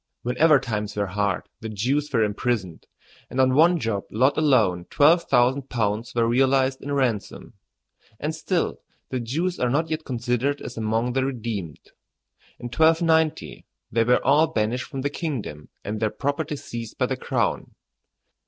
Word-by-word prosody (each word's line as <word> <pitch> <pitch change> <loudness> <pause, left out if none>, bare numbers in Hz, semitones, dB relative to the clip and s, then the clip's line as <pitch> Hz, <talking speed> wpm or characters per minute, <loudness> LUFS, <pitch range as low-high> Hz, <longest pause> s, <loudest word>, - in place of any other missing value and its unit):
Whenever 145 +4 +4
times 105 -4 -4
were 105 -1 0
hard 100 -2 -2
the 110 - -6
Jews 135 +8 -1
were 115 -5 +3
imprisoned, 105 -4 -2 0.4
and 130 - -4
on 130 0 +4
one 170 +5 +5
job 110 -6 -2
lot 130 +6 +2
alone 110 - +2
twelve 165 +4 +4
thousand 130 +3 +2
pounds 115 +1 -2
were 115 -1 +2
realized 130 +2 +2
in 145 - -5
ransom. 125 -7 -2 0.7
And 150 +2 -2
still 170 +2 -2 0.3
the 130 - -2
Jews 160 +10 -2
are 125 - +1
not 160 +5 0
yet 155 0 -2
considered 125 +2 -1
as 120 - -8
among 115 +2 -1
the 135 0 +1
redeemed. 115 - -4 0.8
In - - -10
1290 160 +3 +1 0.2
they 115 +1 +2
were 125 +2 +2
all 150 +4 +5
banished 115 +2 -1
from 135 - -6
the 140 +1 -2
kingdom 125 - -5
and 105 +1 -4
their 110 - +1
property 145 +5 -2
seized 120 -5 -7
by - - +2
the - - -2
crown. - - -2
125 Hz, 160 wpm, -24 LUFS, 110-145 Hz, 0.8 s, one